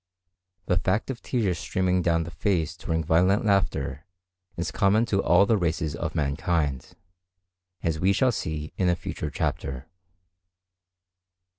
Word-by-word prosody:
The 90 - +2
fact 100 +9 0
of 125 - -8
tears 100 -9 -1
streaming 90 -1 0
down 85 -1 +2
the 85 - -8
face 85 -3 0
during 80 0 -2
violent 90 +7 +3
laughter 95 - 0 0.5
is 85 - -2
common 105 +4 +3
to 100 -4 +1
all 100 - +5
the 110 +1 +3
races 80 -4 -1
of - - -4
mankind, 75 -1 -1 0.9
as 80 -2 0
we 95 +3 +3
shall 125 +6 +3
see 80 -7 -4
in 90 -2 +2
a 90 - +3
future 75 -2 -5
chapter. 70 -3 -3
85 Hz, 140 wpm, -26 LUFS, 80-100 Hz, 0.9 s, all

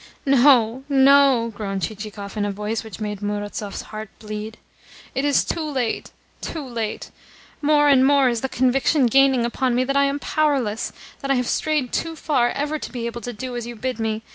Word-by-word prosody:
"No, 260 -3 +4
no!" 270 -4 +5
groaned 195 -3 -4
Chichikov 210 0 -6
in 210 - -1
a 205 - -1
voice 210 +3 -3
which 220 -2 -10
made 210 -2 -4
Murazov's 205 0 -4
heart 215 -1 -6
bleed. 215 0 -7 0.6
"It 270 - -1
is 285 -1 +3
too 335 - -2
late, 265 -7 -2 0.3
too 315 -4 -5
late. 230 -4 -4 0.5
More 295 0 +4
and 270 -2 +5
more 275 -1 +4
is 235 -2 0
the 265 - -2
conviction 260 +3 +2
gaining 265 0 +4
upon 245 +1 0
me 250 - +2
that 275 +2 -2
I 280 0 +4
am 280 +1 0
powerless, 275 -8 0 0.3
that 275 - -5
I 275 - +4
have 250 -1 0
strayed 300 -5 0
too 330 -1 -2
far 280 -6 +1
ever 295 +3 -2
to - - -7
be 240 -2 -4
able 235 0 -5
to 245 - -5
do 245 +2 -6
as 240 -1 -4
you 240 - -7
bid 250 +1 -4
me. 220 0 -2
245 Hz, 195 wpm, -22 LUFS, 220-275 Hz, 0.6 s, no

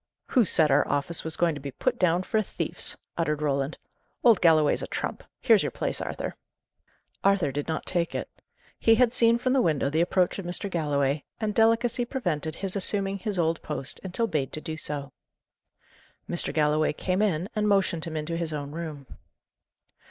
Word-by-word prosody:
"Who 245 -5 +4
said 155 -4 +4
our 145 +2 +4
office 145 +4 0
was 160 0 -1
going 170 -2 +2
to 145 - -7
be 140 - -5
put 130 - -2
down 180 0 +2
for 220 +3 0
a - - +1
thief's!" - - -3 0.2
uttered 150 -3 0
Roland. 140 0 -1 0.5
"Old 230 -5 +5
Galloway's 155 -3 +4
a - - -4
trump! - - -4 0.2
Here's - - +5
your - - -1
place, - - -3
Arthur." - - -4 0.9
Arthur 195 -7 +3
did 145 +2 -4
not 160 -1 -3
take 175 -2 -1
it. - - -3 0.5
He 225 - +5
had 245 0 +3
seen 235 -1 +4
from 255 +2 0
the 270 - +4
window 150 - +1
the 160 +2 +2
approach 180 +2 +1
of 195 - -6
Mr. 180 +3 -2
Galloway, 145 -3 0 0.2
and 215 -2 -1
delicacy 230 +2 +3
prevented 170 - -3
his 195 0 0
assuming 195 0 0
his 205 0 -3
old 165 -1 +1
post 145 -3 -4
until 190 +5 -1
bade 150 - -2
to - - -2
do 160 0 -5
so. 145 -3 -1 1.2
Mr. 175 - -1
Galloway 155 0 +2
came 185 +5 -1
in, 185 -4 +1
and 210 0 +1
motioned 195 -5 +1
him 160 -1 -4
into 155 +2 -3
his 165 -1 -2
own 145 -2 -5
room. 155 -3 -6
170 Hz, 190 wpm, -27 LUFS, 150-200 Hz, 1.2 s, Old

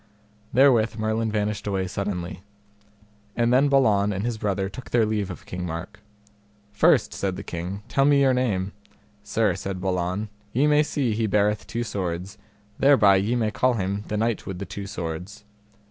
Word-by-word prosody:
Therewith 120 -5 +4
Merlin 110 0 -1
vanished 105 -1 -2
away 95 -2 0
suddenly. 90 -1 -4 0.9
And 120 +1 +2
then 135 +3 +4
Balan 105 -7 +3
and 100 +2 -3
his 120 -2 -2
brother 100 -2 -1
took 125 +6 -9
their 120 -2 +3
leave 105 -2 -1
of 90 - -8
King 90 0 -5
Mark. 90 +5 -6 0.7
First, 105 - +3
said 95 -2 -2
the - - -7
king, 90 +4 -5
tell 135 - +2
me 140 -1 +5
your 135 -1 +4
name. 100 -7 0 0.5
Sir, 105 -1 +1
said 95 +1 -5
Balan, 90 +2 -2 0.2
ye 135 +5 +3
may 150 0 +5
see 140 -6 0
he 110 +1 0
beareth 105 +1 +1
two 115 +1 -2
swords, 95 -1 -4 0.4
thereby 110 -9 +6
ye 105 +6 0
may 110 -3 0
call 130 +3 +2
him 100 0 -2
the 105 - -2
Knight 115 0 -1
with 95 - -4
the 100 - -5
Two 100 +2 -7
Swords. 90 +3 -6
105 Hz, 175 wpm, -24 LUFS, 95-115 Hz, 0.9 s, thereby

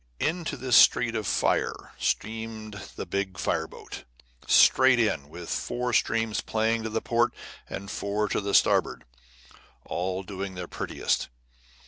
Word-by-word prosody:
Into 165 +1 -1
this 130 -2 +1
street 115 -1 +6
of 110 -4 -2
fire - - 0
steamed 110 - -3
the - - -5
big 100 -2 -3
fire - - -1
boat, - - -10 0.4
straight 130 -1 +6
in, 80 -11 0
with 85 +2 -9
four 125 0 -2
streams 115 -1 +1
playing 110 +1 0
to 110 0 -2
port 120 0 +1 0.3
and 100 +1 -6
four 105 +1 -1
to 100 -1 -1
starboard, - - +3 0.8
all 95 +2 -3
doing 95 0 -6
their 90 0 -5
prettiest. - - -2
110 Hz, 130 wpm, -27 LUFS, 95-115 Hz, 0.8 s, street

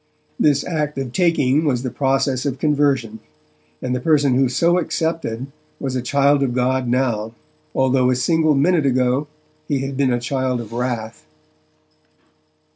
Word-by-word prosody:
This 145 -2 +3
act 150 -4 -3
of 135 -3 -3
taking 155 -5 +2
was 130 -5 0
the 130 - -3
process 135 0 0
of 135 -2 -3
conversion, 140 -6 0 0.6
and 125 - -1
the - - -1
person 145 -1 +2
who 130 0 +2
so 170 +8 +2
accepted 160 -8 -2 0.3
was 135 -2 -3
a 125 - -1
child 140 +3 +2
of 125 -3 0
God 130 0 0
now, 120 -3 -1 0.4
although 130 -1 +2
a 130 - +2
single 155 +3 +2
minute 155 +1 +2
ago 130 +2 +1 0.4
he 140 -3 -1
had 135 0 -5
been 135 -1 +1
a 120 - +1
child 130 0 -1
of 115 -1 -8
wrath. 115 -4 -4
130 Hz, 155 wpm, -20 LUFS, 125-145 Hz, 0.6 s, This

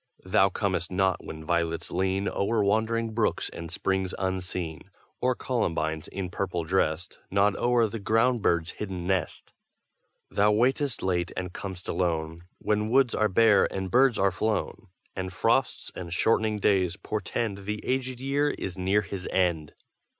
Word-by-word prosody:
Thou 95 +1 +4
comest 95 -2 -1
not 95 0 +1
when 80 0 -8
violets 85 -1 -1
lean 95 +2 0
O'er 105 +2 +1
wandering 110 +2 +1
brooks 110 -1 0
and 85 0 -8
springs 95 +2 -1
unseen, 90 -4 -3 0.3
Or 125 0 +2
columbines, 80 - -1
in 95 -2 -5
purple 90 -3 -2
dressed, 85 -1 -1
Nod 100 +1 +3
o'er 120 -1 +3
the 110 +1 -4
ground 115 +4 +2
bird's 85 -3 +1
hidden 95 -4 -5
nest. 95 -3 -2 0.8
Thou 105 +1 +3
waitest 130 +4 +1
late 90 -2 0
and 90 -1 -4
com'st 95 -2 -7
alone, 80 -1 -1
When 105 0 0
woods 130 0 +4
are 110 - +2
bare 105 0 +4
and 95 -1 -4
birds 130 +1 +4
are 95 0 +3
flown, 110 0 -2 0.3
And 95 -1 -3
frosts 115 +4 +1
and 85 -2 -6
shortening 110 +4 +2
days 95 -3 +2
portend 100 0 -3
The 105 0 -3
aged 130 -1 -1
year 140 +2 +1
is 95 -8 -5
near 95 +3 +2
his 95 -2 -6
end. 85 -5 0
95 Hz, 150 wpm, -27 LUFS, 90-110 Hz, 0.8 s, Thou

